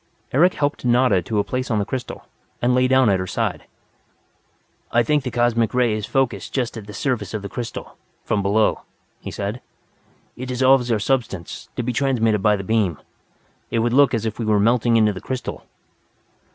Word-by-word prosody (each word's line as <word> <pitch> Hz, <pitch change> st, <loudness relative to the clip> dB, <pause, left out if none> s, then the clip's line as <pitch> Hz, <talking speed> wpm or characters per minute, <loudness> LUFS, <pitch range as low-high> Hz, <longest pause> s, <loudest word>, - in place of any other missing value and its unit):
Eric 175 Hz, +7 st, +4 dB
helped 145 Hz, 0 st, -1 dB
Nada 120 Hz, -5 st, +3 dB
to 105 Hz, +6 st, -3 dB
a 100 Hz, -, +3 dB
place 130 Hz, +3 st, -3 dB
on 110 Hz, -, +1 dB
the 100 Hz, -, 0 dB
crystal, 130 Hz, +2 st, -6 dB, 0.4 s
lay 125 Hz, +1 st, +3 dB
down 130 Hz, -1 st, +4 dB
at 95 Hz, -2 st, +3 dB
her 95 Hz, -, -3 dB
side. -, -, -2 dB, 1.3 s
"I 120 Hz, 0 st, +3 dB
think 150 Hz, +4 st, +2 dB
the 130 Hz, -, -7 dB
Express 120 Hz, -2 st, +1 dB
Ray 125 Hz, -3 st, +3 dB
is 105 Hz, -1 st, -3 dB
focused 120 Hz, -8 st, -1 dB
just 125 Hz, -3 st, -1 dB
at 110 Hz, -3 st, -8 dB
the 105 Hz, -, -9 dB
surface 110 Hz, -5 st, -2 dB
of 105 Hz, -, -4 dB
the 100 Hz, -, -5 dB
crystal, 120 Hz, +2 st, -6 dB, 0.3 s
from 105 Hz, -, 0 dB
below," 105 Hz, +3 st, +2 dB, 0.4 s
he -, -, -7 dB
said. 105 Hz, +5 st, -4 dB, 0.7 s
"It 130 Hz, -, -6 dB
dissolves 130 Hz, -1 st, +3 dB
our 115 Hz, -, +3 dB
substance, 105 Hz, -6 st, -2 dB
to 125 Hz, -, -2 dB
be 125 Hz, +1 st, -2 dB
transmitted 115 Hz, -4 st, +1 dB
by 105 Hz, +1 st, +4 dB
the 95 Hz, -, -5 dB
beam. 100 Hz, -6 st, +1 dB, 0.7 s
It -, -, -1 dB
would 120 Hz, -, 0 dB
look 140 Hz, -1 st, +5 dB
as 115 Hz, -1 st, -2 dB
if 110 Hz, 0 st, -4 dB
we 115 Hz, -, -2 dB
were 105 Hz, -1 st, +3 dB
melting 115 Hz, +2 st, +3 dB
into 105 Hz, -2 st, +3 dB
the 95 Hz, -, -8 dB
crystal." 130 Hz, -1 st, -5 dB
115 Hz, 190 wpm, -21 LUFS, 105-125 Hz, 1.3 s, look